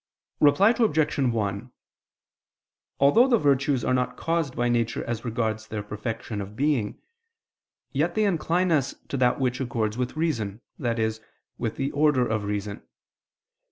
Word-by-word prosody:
Reply 190 +9 +5
Obj. 160 -11 +1
1: 115 -2 -1 1.3
Although 180 - +6
the 245 -3 +4
virtues 140 - +2
are - - +2
not 125 0 0
caused 165 -5 -1
by 120 - +1
nature 115 -1 0
as 115 -1 -4
regards 110 -2 -2
their 105 -2 -4
perfection 105 +1 -5
of 100 +1 -8
being, 135 -5 0 0.9
yet - - 0
they 215 - +2
incline 180 -1 +1
us 140 -4 +1
to 140 - -2
that 125 0 +2
which 125 0 0
accords 115 -3 -2
with 125 +4 -2
reason, 115 -10 -1 0.2
i.e. 115 -2 +1 0.5
with 115 -3 -2
the 135 +1 -2
order 145 -4 +3
of 110 -2 -1
reason. 105 0 -3
125 Hz, 145 wpm, -26 LUFS, 110-145 Hz, 1.3 s, Although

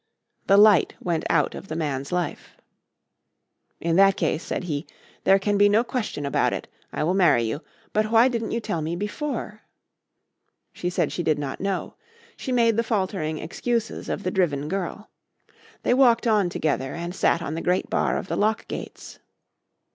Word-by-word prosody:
The 195 - +6
light 205 -4 +6
went 170 -2 -2
out 150 -3 +2
of - - -9
the 155 - -5
man's 140 -4 -3
life. 175 -3 -3 1.2
"In 165 +1 0
that 195 0 +5
case," 155 - 0
said - - -3
he, 145 -5 -3 0.4
"there 195 +1 +6
can 205 +1 0
be 205 0 +6
no 215 +3 +4
question 230 - -3
about 140 - +1
it. - - -5 0.2
I - - -2
will 170 +4 +1
marry 170 -11 +4
you. 115 +7 -3 0.3
But 215 0 +1
why 230 +2 +6
didn't 230 -3 -2
you 230 - -1
tell 170 -7 -3
me 160 +2 -2
before?" 215 - -4 1.1
She 180 - -3
said 180 - 0
she - - -3
did 155 -3 +1
not 140 -2 -5
know. 195 -1 -2 0.4
She 260 - -5
made 230 -3 +3
the 230 - +2
faltering 190 -8 -1
excuses 230 +8 -3
of 205 - -3
the 185 - -1
driven 150 -7 0
girl. 195 +3 -4 0.7
They - - +3
walked 250 -3 +4
on 210 -5 +3
together 140 -5 -1
and 170 +1 -5
sat 170 -2 +1
on 150 - -4
the 165 - -3
great 180 +1 0
bar - - 0
of - - -5
the - - -2
lock 215 +2 0
gates. - - -8
185 Hz, 180 wpm, -24 LUFS, 160-215 Hz, 1.2 s, The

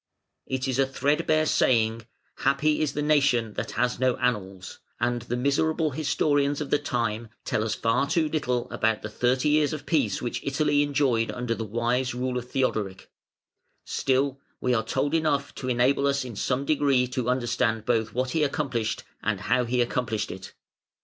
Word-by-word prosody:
It 130 0 -2
is 130 0 -1
a 135 - +4
threadbare 150 +3 +1
saying, 115 -5 +2 0.3
"Happy 150 +3 +2
is 150 -3 0
the 150 - -2
nation 140 -7 +2
that - - -4
has 125 0 0
no 130 -1 +2
annals", 100 -7 -2 0.2
and 120 0 0
the 120 +1 -3
miserable 155 +4 +1
historians 145 0 +1
of 150 - -5
the 145 - +3
time 115 -5 -2 0.2
tell 110 - 0
us 110 -1 -1
far 115 +5 +1
too 160 -2 +2
little 125 -6 -1
about 110 -1 0
the 110 - -5
thirty 125 +5 +1
years 150 0 +3
of 150 - -6
peace 140 - +1
which 120 - -4
Italy 145 +1 +2
enjoyed 135 -6 +1
under 125 -2 -2
the 115 - -4
wise 120 +4 -1
rule 125 0 -1
of 125 0 -11
Theodoric; 105 -8 -2 0.7
still 135 +1 0 0.2
we 125 - +1
are 110 -2 +1
told 145 +6 -1
enough 155 -3 +1
to 130 - -5
enable 130 +3 +2
us 140 -1 0
in 120 -3 -7
some 125 +6 -1
degree 140 -4 +3
to 125 -1 -2
understand 120 -3 0
both 115 -2 +1
what 130 +1 -1
he 160 - 0
accomplished 135 -6 -1 0.2
and 105 -3 -1
how 125 +3 +1
he 125 +1 +1
accomplished 120 -3 -2
it. 95 0 -9
125 Hz, 175 wpm, -26 LUFS, 115-140 Hz, 0.7 s, a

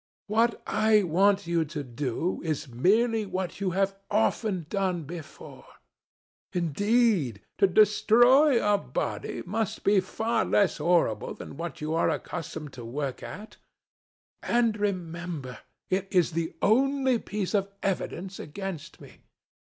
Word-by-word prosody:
What 225 +3 +1
I 215 -1 +3
want 195 +3 +3
you 170 -1 +1
to 150 -1 -5
do 130 +7 -3
is 155 -2 -2
merely 215 - +2
what 185 0 -4
you 195 - +1
have 195 0 +1
often 210 -4 0
done 185 -3 -1
before. 160 +1 -10 0.9
Indeed, 180 - +1 0.2
to 195 - +6
destroy 240 - +5
a 205 -1 +3
body - - -4
must 210 +3 -2
be 200 0 +4
far 220 +4 -1
less 200 -3 +2
horrible 165 -12 +1
than - - -9
what 165 +1 -6
you 155 +1 -2
are 165 - +2
accustomed 155 -4 -5
to 125 - -9
work 130 +3 -4
at. 210 +3 -9 0.8
And, 235 -2 +2
remember, 170 - -4 0.3
it 190 +1 0
is 180 -3 +2
the 165 0 -3
only 265 +2 +3
piece 205 -3 -4
of 200 -1 +1
evidence 190 0 -3
against 185 0 -7
me. - - -14
190 Hz, 130 wpm, -27 LUFS, 165-215 Hz, 0.9 s, to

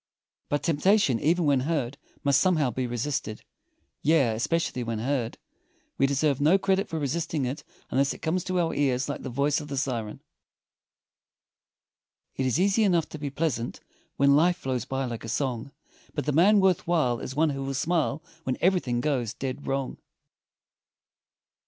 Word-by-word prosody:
But 145 - 0
temptation, 165 - +3
even 170 +5 +2
when 140 -2 +3
heard, 140 -2 -2 0.2
must 140 -1 +4
somehow 155 -8 +2
be 130 0 -2
resisted. 120 -2 -3 0.6
Yea, 140 -7 +3
especially 125 +3 -1
when 115 -1 -3
heard! 120 0 -2 0.6
We 135 - +4
deserve 140 0 +1
no 160 +7 +5
credit 195 +1 0
for 165 - -3
resisting 155 0 -1
it 130 +5 -4 0.3
unless 140 +2 +2
it - - -6
comes 170 +2 0
to 185 -1 0
our 165 -2 +1
ears 135 -3 +1
like 145 - -4
the 135 - -5
voice 140 +4 +1
of 150 - -8
the 140 -1 -4
siren. 120 -5 -3 2.1
It 130 - 0
is 130 +5 +1
easy 200 +4 +3
enough 175 -5 +2
to 155 - -8
be 145 -1 -3
pleasant, 140 -5 -2 0.4
When 140 0 +5
life 175 +4 +4
flows 130 -6 -3
by 135 0 -2
like 120 -2 -5
a 115 - -6
song, 130 +1 -2 0.4
But 145 - -2
the 150 - +1
man 190 +8 +5
worth 190 -4 +2
while 150 -9 +2
is 130 - -6
one 155 +1 +3
who 135 -1 -4
will 135 0 -3
smile, 160 0 0 0.2
When 130 - -2
everything 170 -10 +1
goes 130 -7 -1
dead 135 +1 -5
wrong. 135 -1 -2
140 Hz, 170 wpm, -27 LUFS, 130-165 Hz, 2.1 s, no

